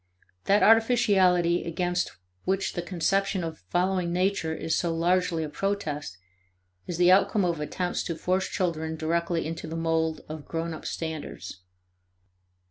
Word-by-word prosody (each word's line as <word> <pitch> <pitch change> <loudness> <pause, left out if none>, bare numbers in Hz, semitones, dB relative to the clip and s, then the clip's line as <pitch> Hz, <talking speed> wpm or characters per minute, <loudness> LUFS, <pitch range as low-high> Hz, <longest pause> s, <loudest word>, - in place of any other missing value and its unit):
That 205 +1 +4
artificiality 200 -7 +4
against 175 +1 -1 0.3
which 195 +1 0
the 175 - -2
conception 190 +2 0
of 160 -1 -5
following 180 -1 +1
nature 180 -2 0
is 160 0 -1
so 170 - 0
largely 170 0 +1
a - - -3
protest, 150 - -3 0.7
is 175 - -3
the 180 +1 +5
outcome 195 +1 +4
of 170 -3 -1
attempts 180 +4 -2
to 165 - -2
force 185 +3 0
children 160 -3 -1
directly 170 +1 -1
into 165 +1 -5
the 160 - -5
mold 160 -1 0
of 155 -1 -8
grown 165 0 -3
up 160 - -9
standards. 160 - -5
175 Hz, 140 wpm, -27 LUFS, 160-185 Hz, 0.7 s, the